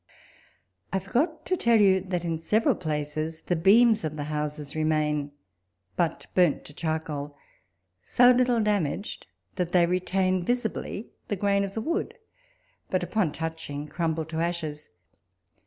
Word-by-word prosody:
I 195 - +1
forgot 255 - -1
to 370 - +1
tell 235 -9 +3
you, 190 -2 +5
that 180 -2 -3
in 165 -1 -1
several 215 +7 +2
places 155 0 -3
the 175 - -1
beams 215 +6 +5
of 155 -1 -3
the 150 - -3
houses 150 -1 -4
remain, 150 -2 0 0.6
but 165 -2 -1
burnt 175 -5 +3
to 145 - -10
ckarcoal; 155 -2 -3 0.7
so 245 - +5
little 250 -1 +3
damaged 205 -3 -1 0.3
that 175 -2 -2
they 175 -2 +6
retain 185 +1 +1
visibly 230 -1 -2 0.2
the 205 - -1
grain 200 +1 +1
of 195 0 -5
the 220 - -1
wood, 335 - -2 0.7
but 185 -1 0
upon 180 -3 0
touching 160 -2 -5
crumble 160 0 -1
to 160 +1 -6
aslies. 160 -3 -3
175 Hz, 140 wpm, -27 LUFS, 155-200 Hz, 0.7 s, they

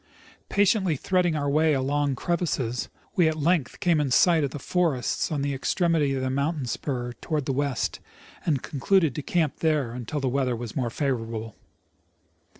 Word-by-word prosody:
Patiently 195 -4 +3
threading 175 +3 +1
our 145 -1 -1
way 155 +1 +3
among 140 +1 0
crevasses, 135 -7 -1 0.3
we 175 -3 +4
at 160 0 0
length 155 -2 +1
came 175 -5 +3
in 145 - 0
sight 165 +4 +4
of 140 - 0
the 140 - -6
forests 160 -2 0
on 145 -3 -1
the 140 0 -1
extremity 150 0 +1
of 130 - -2
the 130 - 0
moun 140 +5 0
tain 140 -4 -4
spur 120 0 -3
toward 150 -4 -2
the 135 - -1
west, 140 -4 -1 0.4
and 145 -5 0
concluded 160 +1 +2
to 150 - -4
camj) 155 -1 0
there 150 -7 +1
until 125 +4 -4
the 135 - -1
weather 130 -1 0
was 115 -2 -6
more 125 -3 0
favorable. 115 -5 -3
145 Hz, 175 wpm, -26 LUFS, 130-160 Hz, 0.4 s, we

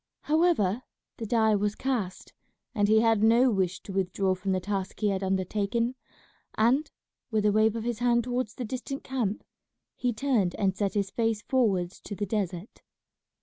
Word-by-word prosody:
However 300 - +2 0.4
the 225 - -5
die 220 -1 +3
was 205 0 0
cast, 230 -9 -3 0.4
and 205 -4 +2
he 220 +1 +5
had 225 -2 +3
no 235 +3 +5
wish 185 -3 -1
to 195 - -8
withdraw 190 0 0
from 185 +1 -3
the 185 - +1
task 195 0 -4
he 210 - +2
had 195 -1 -1
undertaken; 200 +5 0 0.6
and, 255 +8 +2 0.4
with 215 -3 0
a 210 - +5
wave 215 +1 +3
of 225 - -3
his 235 -1 -2
hand 240 -1 +3
towards 245 -2 -2
the 250 - -4
distant 260 +4 -5
camp, 235 -6 -2 0.5
he 245 - 0
turned 225 -7 0
and 190 -2 0
set 200 0 -1
his 200 -1 0
face 225 -2 0
forwards 195 -9 +1
to 205 - -7
the 205 - -2
desert. 195 -2 -4
215 Hz, 175 wpm, -28 LUFS, 195-240 Hz, 0.6 s, he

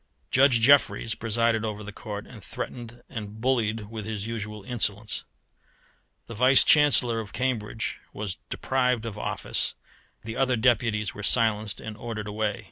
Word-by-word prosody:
Judge 130 -2 +5
Jeffreys 125 -3 +4
presided 115 0 0
over 105 -1 -4
the 105 - -7
Court, 105 -2 -7
and - - -13
threatened 120 0 -7
and 105 -3 -7
bullied 110 -4 0
with 110 -2 -5
his 105 -2 -4
usual 105 -2 -5
insolence. 105 -3 -2 1.0
The - - -9
Vice 130 +4 +6
Chancellor 140 -6 +5
of 105 -3 -7
Cambridge 115 -4 -2
was 105 -3 -5
deprived 125 -3 0
of 110 -3 -5
office, 105 - -2 0.5
the 115 0 -6
other 130 -1 +2
deputies 115 -3 +1
were 105 - -8
silenced 110 -2 +1
and 110 -1 -7
ordered 110 -1 -5
away. 105 0 -2
110 Hz, 145 wpm, -26 LUFS, 105-120 Hz, 1.0 s, Vice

